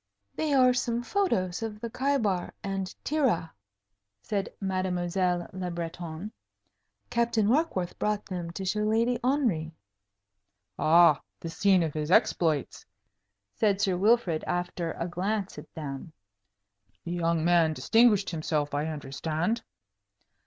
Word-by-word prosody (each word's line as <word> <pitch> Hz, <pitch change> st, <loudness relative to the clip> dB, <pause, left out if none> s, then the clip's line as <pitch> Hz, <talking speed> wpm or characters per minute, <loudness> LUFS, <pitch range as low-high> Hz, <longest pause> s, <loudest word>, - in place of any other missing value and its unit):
"They 310 Hz, -1 st, -1 dB
are 255 Hz, -1 st, +6 dB
some 240 Hz, -1 st, -1 dB
photos 215 Hz, -, 0 dB
of 220 Hz, -2 st, -5 dB
the 235 Hz, -, -4 dB
Khaibar 225 Hz, -9 st, 0 dB
and 195 Hz, -1 st, -2 dB, 0.2 s
Tirah," 260 Hz, -, +1 dB, 0.7 s
said 200 Hz, -2 st, -2 dB
Mademoiselle 180 Hz, -2 st, -1 dB
Le 185 Hz, -1 st, -4 dB
Breton. 170 Hz, +2 st, -5 dB, 0.8 s
"Captain 235 Hz, -3 st, +2 dB
Warkworth 230 Hz, -, 0 dB
brought 210 Hz, -1 st, -1 dB
them 175 Hz, -3 st, -5 dB
to 190 Hz, +3 st, -6 dB
show 200 Hz, +3 st, 0 dB
Lady 225 Hz, +3 st, +1 dB
Henry." 225 Hz, -, 0 dB, 1.0 s
"Ah, 165 Hz, -2 st, +6 dB, 0.2 s
the 165 Hz, -, -6 dB
scene 190 Hz, 0 st, +3 dB
of 155 Hz, -3 st, -2 dB
his 150 Hz, 0 st, -3 dB
exploits," 160 Hz, -5 st, +2 dB, 0.7 s
said 200 Hz, -, +1 dB
Sir 195 Hz, -3 st, +2 dB
Wilfrid, 195 Hz, -4 st, +2 dB
after 175 Hz, -1 st, -2 dB
a 170 Hz, -, -4 dB
glance 195 Hz, +3 st, -2 dB
at -, -, -13 dB
them. 150 Hz, 0 st, -6 dB, 0.9 s
"The -, -, -5 dB
young 170 Hz, -2 st, 0 dB
man 170 Hz, -2 st, +4 dB
distinguished 225 Hz, +2 st, +3 dB
himself, 155 Hz, -3 st, -1 dB
I 145 Hz, +2 st, 0 dB
understand?" 160 Hz, -, -2 dB
185 Hz, 125 wpm, -28 LUFS, 165-220 Hz, 1.0 s, are